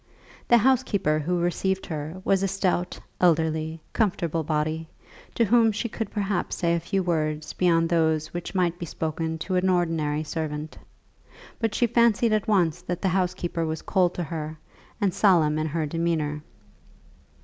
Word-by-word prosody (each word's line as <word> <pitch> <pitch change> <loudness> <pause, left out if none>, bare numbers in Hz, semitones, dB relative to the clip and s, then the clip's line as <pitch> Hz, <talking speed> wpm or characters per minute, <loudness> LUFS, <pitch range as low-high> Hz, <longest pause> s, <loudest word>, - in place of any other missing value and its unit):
The 240 - +6
housekeeper 230 - +2
who 175 +4 -1
received 190 +2 0
her 155 +2 -5
was 195 -1 +3
a 195 - +1
stout, 185 -2 -1 0.2
elderly, 160 -2 +1
comfortable 170 -7 0
body, 155 +1 -1 0.5
to 230 - +3
whom 225 +1 +4
she 215 +3 -2
could 225 -2 -4
perhaps 200 -1 -2
say 170 -2 +1
a 170 - +1
few 190 +3 -1
words 155 -3 -1
beyond 165 -2 +3
those 160 -2 +1
which 175 +2 -5
might 175 -2 +1
be 170 - -5
spoken 160 +1 -3
to 175 +4 -4
an 185 +1 +2
ordinary 160 -4 0
servant; 155 -1 -4 0.8
but 225 -2 -1
she 240 - +3
fancied 235 -1 +3
at 215 0 0
once 175 -6 +2
that 180 +1 -5
the 190 - +3
housekeeper 180 -2 -1
was 160 -1 -3
cold 180 -3 +1
to 175 - -2
her, 155 0 -5 0.4
and 200 -4 +1
solemn 160 -7 +3
in 155 - -1
her 160 +1 -1
demeanour. 155 -1 -1
170 Hz, 160 wpm, -25 LUFS, 160-195 Hz, 0.8 s, The